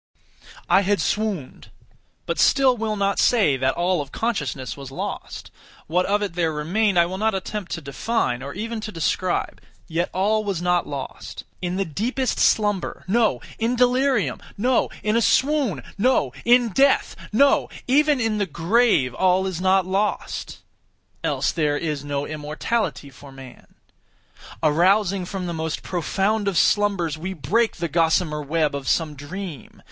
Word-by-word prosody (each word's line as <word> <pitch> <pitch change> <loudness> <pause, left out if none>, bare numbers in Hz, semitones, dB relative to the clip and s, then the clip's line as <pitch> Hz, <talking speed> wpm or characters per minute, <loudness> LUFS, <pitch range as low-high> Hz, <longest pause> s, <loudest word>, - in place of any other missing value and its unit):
I - - +5
had 200 +1 +1
swooned; 205 -11 -2 0.6
but - - -3
still 265 -2 +4
will 220 -2 -2
not 200 -1 0
say 205 - +4
that 130 0 0
all 175 -1 +1
of 140 -1 -9
consciousness 145 - -2
was 140 -2 -9
lost. 135 - -6 0.3
What 180 +3 0
of 205 +1 +1
it 200 - -3
there 165 -2 0
remained 180 +7 0
I 170 - +6
will 185 +2 -5
not 220 -1 +1
attempt 190 0 -5
to 165 - -4
define, 140 - -1
or 140 +1 -6
even 225 +2 -4
to 215 - -6
describe; 175 +1 -1 0.3
yet 170 +2 -1
all 215 +3 +1
was 200 -5 -2
not 180 0 +1
lost. 140 -2 -7 0.2
In 180 0 -2
the 195 +1 0
deepest 240 - -2
slumber—no! 210 +1 +1 0.2
In 230 +2 +1
delirium—no! 250 -1 +1
In 215 +1 +1
a 230 - +3
swoon—no! 245 - +1
In 240 0 +5
death—no! 275 +1 +2 0.2
even 290 +2 +3
in 225 -3 0
the 200 - 0
grave 170 - +2
all 185 +4 +2
is 185 -2 -3
not 190 0 +3
lost. 195 +3 -2 0.6
Else - - 0
there 150 -3 0
is 150 -3 -3
no 145 0 -2
immortality 155 +2 -3
for 135 +2 -14
man. 135 -2 -14 0.9
Arousing 185 +4 +3
from 190 0 -5
the 170 - -3
most 160 -1 -3
profound 195 +4 -1
of 195 -4 0
slumbers, 185 -7 +2
we 190 +4 -4
break 200 - 0
the 170 0 -3
gossamer 160 -1 +1
web 155 +1 0
of 140 -1 -5
some 160 -3 +1
dream. 150 +1 -8
185 Hz, 150 wpm, -23 LUFS, 155-215 Hz, 0.9 s, I